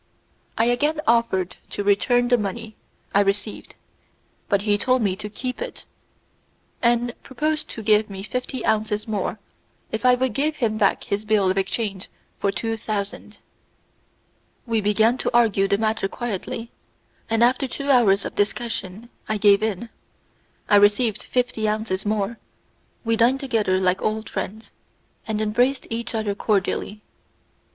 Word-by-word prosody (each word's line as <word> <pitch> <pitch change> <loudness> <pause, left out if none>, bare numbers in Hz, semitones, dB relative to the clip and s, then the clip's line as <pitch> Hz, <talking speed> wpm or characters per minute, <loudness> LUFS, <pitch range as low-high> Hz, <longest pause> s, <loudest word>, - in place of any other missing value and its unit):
I 225 - +3
again 295 +6 +1
offered 225 -6 +1
to 205 - -3
return 245 +5 +3
the 245 - +5
money 215 +2 -4 0.4
I 200 - +5
received, 205 +1 -2 0.7
but 200 -1 +2
he 205 -1 +3
told 255 +3 +1
me 190 -3 +1
to 210 - -6
keep 250 - -4
it, - - -6 1.0
and 240 0 +2
proposed 305 +4 -2
to 225 - -7
give 210 0 +3
me 195 -1 -7
fifty 250 +3 -4
ounces 215 0 0
more 215 0 -2 0.5
if 220 - -3
I 250 0 +6
would 255 -2 -1
give 300 +6 0
him 220 -6 -1
back 200 - +2
his 200 +1 -2
bill 210 -3 +2
of 190 - -3
exchange 195 0 -3 0.3
for 200 - +1
two 225 +2 -3
thousand. 210 0 -5 1.3
We 225 -3 0
began 220 +4 +3
to - - 0
argue 205 -4 +3
the 200 - +2
matter 220 -2 0
quietly, 230 +1 -5 0.6
and 225 +1 +3
after 255 +3 +3
two 280 +3 -2
hours 205 -6 +4
of - - -4
discussion 210 0 -2 0.2
I 215 - +1
gave 200 -1 +5
in. 220 +1 -2 0.8
I 205 - +6
received 205 +1 +3
fifty 245 -3 0
ounces 210 -2 -2
more, 210 +2 -1 0.7
we 225 0 +2
dined 245 +4 +4
together 225 -8 +1
like 185 0 +1
old 220 0 -2
friends, 205 +3 -5 0.6
and 215 -1 -1
embraced 245 +5 +1
each 230 0 -3
other 215 -2 -1
cordially. 205 0 -1
220 Hz, 150 wpm, -23 LUFS, 205-240 Hz, 1.3 s, I